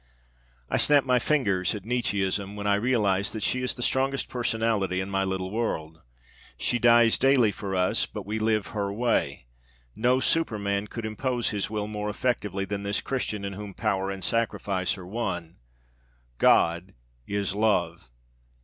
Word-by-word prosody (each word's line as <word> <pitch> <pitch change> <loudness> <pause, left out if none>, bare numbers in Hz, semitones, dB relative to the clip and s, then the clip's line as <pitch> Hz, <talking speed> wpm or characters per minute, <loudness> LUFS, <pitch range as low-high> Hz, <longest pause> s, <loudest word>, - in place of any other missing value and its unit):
I - - 0
snap 145 -2 +5
my 125 -1 +3
fingers 105 - +1
at 100 -2 -8
Nietzscheism 100 -4 -1
when 105 0 -6
I 100 - +3
realize 100 -3 +1
that 110 -2 -5
she 125 - +1
is 125 - -1
the 120 - -3
strongest 135 +2 0
personality 110 -6 0
in 95 +1 -4
my 95 0 +1
little 95 -1 -3
world. 80 -8 -3 0.6
She 120 - 0
dies 120 -1 +5
daily 130 -5 +4
for 100 -2 -5
us, 90 0 +1
but - - -7
we 105 +2 -3
live 110 -2 +1
her 100 -2 -2
way! 115 - 0 0.5
No 125 +3 +2
superman 105 -9 0
could 115 +2 -6
impose 120 +3 -1
his 100 -2 -2
will 105 -1 -2
more 105 0 -4
effectively 105 -4 -1
than 100 +1 -4
this 100 0 -1
Christian 110 -6 -3
in 100 - -4
whom 100 -1 -8
power 95 -3 -1
and 95 -1 -5
sacrifice 100 -3 0
are 90 - -9
one. 90 -5 -4 0.8
God 85 +3 +3 0.3
is 100 -2 -1
love. 90 - 0
105 Hz, 160 wpm, -26 LUFS, 95-115 Hz, 0.8 s, snap